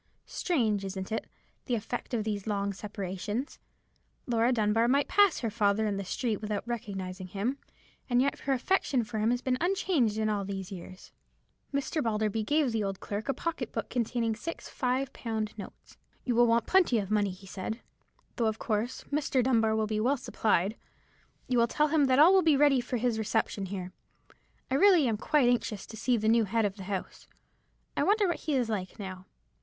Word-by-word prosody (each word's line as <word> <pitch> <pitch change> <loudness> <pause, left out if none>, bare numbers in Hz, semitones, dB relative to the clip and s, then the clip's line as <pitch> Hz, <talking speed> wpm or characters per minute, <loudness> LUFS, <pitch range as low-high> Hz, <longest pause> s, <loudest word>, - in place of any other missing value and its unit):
Strange, 225 - 0
isn't 190 +1 -5
it, 225 - -2 0.4
the 245 - 0
effect 230 +2 -4
of 220 - 0
these 210 -1 -3
long 200 -1 -1
separations? 205 - -5 0.7
Laura 235 0 +2
Dunbar 225 0 +2
might 280 +3 +3
pass 405 -4 +4
her 230 -3 -1
father 210 0 +2
in 205 -2 -1
the 200 - -3
street 215 +3 -1
without 210 +1 -3
recognizing 190 -5 -5
him, 215 +9 -2 0.5
and 245 0 +3
yet 275 +2 +1
her 275 - 0
affection 265 -2 +1
for 215 0 -4
him 215 +2 +2
has 245 +1 0
been 255 -1 0
unchanged 340 - +1
in 220 0 +1
all 205 -2 0
these 195 -1 -5
years." 185 0 -10 0.6
Mr. 280 +3 -1
Balderby 220 -2 0
gave 290 +2 +2
the 225 -2 0
old 195 -1 -3
clerk 210 +6 -5
a - - +3
pocket 315 -8 -3
book 225 - -4
containing 230 -2 0
six 335 +9 -6
five 260 +1 -1
pound 220 -2 -3
notes. 200 -3 -11 0.3
"You 250 - +1
will 240 +1 +5
want 230 0 +3
plenty 360 -10 +4
of 200 -2 -2
money," 205 -2 +2
he 185 +1 -10
said, 200 +4 -5 0.6
"though, 230 - +2
of 220 0 -1
course, 225 +3 -2
Mr. 280 -3 +1
Dunbar 225 -3 +3
will 220 0 +1
be 215 0 -1
well 260 +6 +2
supplied. 215 -3 0 0.7
You 250 -2 +2
will 235 - +4
tell 300 +5 +1
him 300 -2 +3
that 260 -1 +3
all 320 +6 +8
will 380 - +6
be 315 -5 +4
ready 280 -3 +4
for 245 - -3
his 235 -1 0
reception 215 -2 -1
here. 185 -1 -6 0.8
I - - +1
really 340 -1 +5
am 220 -2 0
quite 295 +2 +2
anxious 230 -4 0
to 225 - -10
see 235 +3 +1
the 215 0 -1
new 225 0 +4
head 225 +2 +1
of 200 0 -2
the 190 - -8
house. 195 -1 -5 0.7
I - - 0
wonder 415 0 +3
what 345 -3 -1
he 300 - +2
is 250 -3 +1
like, 200 -4 -4
now. 190 -3 -7
225 Hz, 200 wpm, -29 LUFS, 205-260 Hz, 0.8 s, all